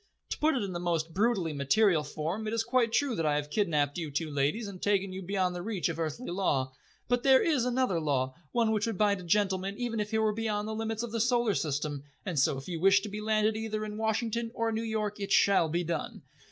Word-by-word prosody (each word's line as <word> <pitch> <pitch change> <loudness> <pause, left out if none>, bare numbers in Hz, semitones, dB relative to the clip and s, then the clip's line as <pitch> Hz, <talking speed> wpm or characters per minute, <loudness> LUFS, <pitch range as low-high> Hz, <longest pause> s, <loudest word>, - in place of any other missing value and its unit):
To - - -2
put 310 0 +3
it 245 - 0
in 195 -2 -4
the 175 - -3
most 165 -2 -1
brutally 195 -5 +1
material 155 +4 +3
form, 160 +8 -4
it 215 - -2
is 225 - +1
quite 235 0 +2
true 265 0 +1
that 165 - -1
I 150 - +2
have 150 0 -3
kidnapped 150 -6 +1
you 160 -3 -4
two 150 +2 -3
ladies 145 +11 0
and 190 -2 -9
taken 195 -2 +1
you 190 - -5
beyond 185 -1 0
the 175 - -5
reach 195 -3 -1
of 165 0 -4
earthly 165 - -3
law. 135 -8 0 0.3
But 245 0 +1
there 265 0 +5
is 290 -7 +2
another 250 -8 +1
law, 135 -4 0 0.2
one 230 -2 +2
which 215 0 0
would 225 -4 -2
bind 205 -1 +2
a - - -9
gentleman 195 +1 0
even 240 -2 -2
if 210 0 -2
he 220 - 0
were 220 -1 +2
beyond 215 -1 -2
the 220 - -3
limits 220 +1 -3
of 240 - -5
the 230 -1 -1
Solar 240 -2 +2
System, 145 -3 -2 0.2
and 175 -7 -1
so 135 +1 +2
if 135 - -8
you 170 -3 -4
wish 195 +3 +5
to 210 - -6
be 210 +1 -5
landed 215 0 +2
either 215 -1 -3
in 210 0 -6
Washington 225 +1 -1
or 230 0 0
New 220 0 -1
York 215 -2 -2
it 200 0 -4
shall 195 -6 +4
be 170 +3 0
done. 170 0 -4
205 Hz, 250 wpm, -30 LUFS, 165-225 Hz, 0.3 s, there